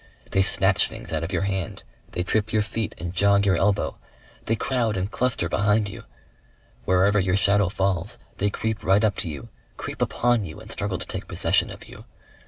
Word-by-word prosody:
They 95 Hz, -, +3 dB
snatch 95 Hz, -, +4 dB
things -, -, -8 dB
out 80 Hz, 0 st, -1 dB
of 85 Hz, -, -4 dB
your 90 Hz, 0 st, 0 dB
hand, 95 Hz, -4 st, -3 dB, 0.3 s
they 90 Hz, -, -1 dB
trip 110 Hz, +4 st, 0 dB
your 110 Hz, -1 st, +2 dB
feet 110 Hz, 0 st, -3 dB
and 85 Hz, 0 st, -5 dB
jog 100 Hz, +2 st, +4 dB
your 95 Hz, -2 st, +4 dB
elbow. 100 Hz, +3 st, +1 dB, 0.5 s
They 115 Hz, -, +1 dB
crowd 115 Hz, -4 st, 0 dB
and 95 Hz, +3 st, -2 dB
cluster 115 Hz, -3 st, 0 dB
behind 105 Hz, +4 st, +2 dB
you. 95 Hz, -, -10 dB, 0.8 s
Wherever 95 Hz, +3 st, +4 dB
your 95 Hz, -1 st, +1 dB
shadow 100 Hz, -1 st, +3 dB
falls, 95 Hz, -2 st, -1 dB, 0.2 s
they 105 Hz, -, +1 dB
creep 110 Hz, +1 st, -3 dB
right 95 Hz, +3 st, +4 dB
up 105 Hz, -3 st, +2 dB
to 85 Hz, -, -2 dB
you, 70 Hz, -4 st, -7 dB, 0.3 s
creep -, -, -6 dB
upon 120 Hz, -2 st, +2 dB
you 95 Hz, +2 st, -8 dB
and 110 Hz, 0 st, -11 dB
struggle 100 Hz, -4 st, -1 dB
to -, -, -6 dB
take -, -, -5 dB
possession -, -, +2 dB
of -, -, -10 dB
you. -, -, -12 dB
100 Hz, 195 wpm, -24 LUFS, 95-105 Hz, 0.8 s, snatch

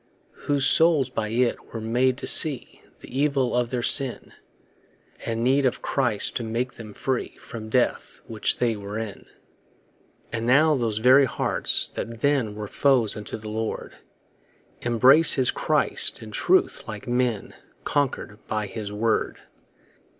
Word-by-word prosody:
Whose 140 Hz, -2 st, +1 dB
souls 150 Hz, -4 st, +3 dB
by 110 Hz, -3 st, -3 dB
it 120 Hz, +2 st, -1 dB
were -, -, -3 dB
made 125 Hz, +3 st, 0 dB
to -, -, -6 dB
see 150 Hz, -6 st, +2 dB, 0.2 s
The 130 Hz, -, -6 dB
evil 140 Hz, -4 st, +1 dB
of 120 Hz, -1 st, 0 dB
their 120 Hz, -1 st, -3 dB
sin; 135 Hz, -1 st, +3 dB, 0.9 s
And 115 Hz, 0 st, -2 dB
need 135 Hz, +3 st, +2 dB
of 130 Hz, -2 st, -1 dB
Christ 120 Hz, -7 st, 0 dB
to 120 Hz, -, -4 dB
make 120 Hz, +3 st, -3 dB
them 110 Hz, -3 st, -11 dB
free 130 Hz, -2 st, -3 dB
From 110 Hz, -2 st, -9 dB
death, 125 Hz, +2 st, -1 dB
which 110 Hz, -2 st, -1 dB
they 120 Hz, -2 st, 0 dB
were 100 Hz, +1 st, -7 dB
in. 110 Hz, -3 st, -7 dB, 1.0 s
And 115 Hz, +1 st, -3 dB
now 150 Hz, +5 st, +4 dB
those 115 Hz, -6 st, -1 dB
very 130 Hz, +5 st, +5 dB
hearts -, -, +1 dB
that 115 Hz, 0 st, -7 dB
then 135 Hz, -7 st, 0 dB
Were 105 Hz, -1 st, -6 dB
foes 125 Hz, -3 st, +1 dB
unto 105 Hz, +1 st, -6 dB
the 110 Hz, -1 st, -9 dB
Lord, 110 Hz, +1 st, -4 dB, 0.9 s
Embrace 130 Hz, +7 st, +5 dB
his 130 Hz, -2 st, +2 dB
Christ -, -, 0 dB
and 110 Hz, -1 st, -11 dB
truth, -, -, +1 dB
like 105 Hz, +1 st, -8 dB
men 120 Hz, -3 st, -1 dB, 0.3 s
Conquer'd 130 Hz, -7 st, -2 dB
by 110 Hz, -1 st, -2 dB
his 105 Hz, 0 st, -7 dB
word. 110 Hz, +2 st, -1 dB
120 Hz, 150 wpm, -24 LUFS, 110-130 Hz, 1.0 s, very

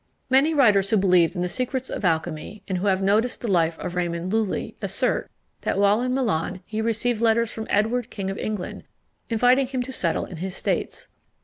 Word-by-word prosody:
Most 285 Hz, +5 st, +4 dB
writers 205 Hz, -8 st, +4 dB
who 220 Hz, -, +3 dB
believed 180 Hz, -3 st, +3 dB
in 175 Hz, -, -2 dB
the -, -, 0 dB
secrets 255 Hz, +6 st, -2 dB
of -, -, -4 dB
alchymy, 165 Hz, +3 st, -2 dB
and 185 Hz, -2 st, -1 dB
who 200 Hz, -, -1 dB
have 190 Hz, 0 st, +2 dB
noticed 215 Hz, +5 st, +1 dB
the 240 Hz, -, -3 dB
life 165 Hz, -2 st, +2 dB
of 180 Hz, -, -5 dB
Raymond 175 Hz, +1 st, -2 dB
Lulli, 220 Hz, -3 st, -1 dB
assert, -, -, -1 dB, 0.3 s
that -, -, -1 dB
while 205 Hz, +3 st, +4 dB
in 250 Hz, 0 st, -1 dB
Milan, 195 Hz, -8 st, -1 dB
he 220 Hz, 0 st, -3 dB
received 230 Hz, +1 st, 0 dB
letters 230 Hz, 0 st, +3 dB
from 220 Hz, -1 st, -6 dB
Edward 225 Hz, +3 st, +1 dB
King 195 Hz, -2 st, -4 dB
of 195 Hz, -, -6 dB
England, 210 Hz, -4 st, -4 dB, 0.4 s
inviting 250 Hz, +3 st, +3 dB
him 255 Hz, -1 st, -2 dB
to 265 Hz, -, -7 dB
settle 170 Hz, -8 st, 0 dB
in 180 Hz, -, -9 dB
his 185 Hz, +2 st, -4 dB
states. -, -, -2 dB
210 Hz, 200 wpm, -24 LUFS, 180-240 Hz, 0.4 s, Most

